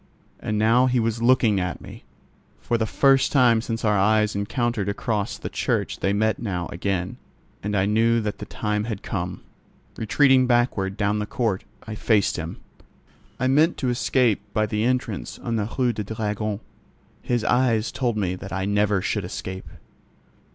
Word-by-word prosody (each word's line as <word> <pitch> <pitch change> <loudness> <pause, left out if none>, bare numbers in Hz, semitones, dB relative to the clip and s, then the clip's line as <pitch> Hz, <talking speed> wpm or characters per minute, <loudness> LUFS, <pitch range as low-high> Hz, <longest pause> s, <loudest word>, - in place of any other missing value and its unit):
And 105 - -2
now 115 +4 +4
he 125 -1 +2
was 115 0 -1
looking 115 -4 +4
at 90 -1 -3
me. - - -12 0.5
For 120 - -1
the 110 -1 0
first 135 +3 +3
time 120 -5 +4
since 115 -1 -3
our 105 -1 +3
eyes 105 +1 +2
encountered 110 0 -1
across 100 0 -2
the - - -6
church - - -2
they 95 - +1
met 110 +2 +1
now 95 -6 -3
again, 90 0 -2 0.4
and 105 0 -1
I 95 - +2
knew 115 +3 +3
that 105 -1 -4
the - - -7
time 105 -1 -2
had 110 -4 -5
come. 90 -1 -4 0.6
Retreating 130 +3 +4
backward, 120 -5 +1
down 105 0 +1
the 105 - -3
court, 110 -6 -1 0.2
I 110 - -6
faced 105 -2 +1
him. 80 -1 -5 0.8
I 130 - 0
meant 150 +6 +3
to 130 - -1
escape 120 -3 +2
by 110 - +3
the 105 +1 -1
entrance 125 0 -2
on 115 -1 -3
the 105 -1 -1
Rue 125 -2 +2
du 105 - -4
Dragon. 105 0 -3 0.6
His 120 -2 -1
eyes 120 -3 +2
told 120 -4 -1
me 95 -4 0
that 95 +1 -8
I 95 0 -2
never 100 -1 +1
should 105 -1 -1
escape. 95 +1 -6
110 Hz, 170 wpm, -24 LUFS, 100-120 Hz, 0.8 s, now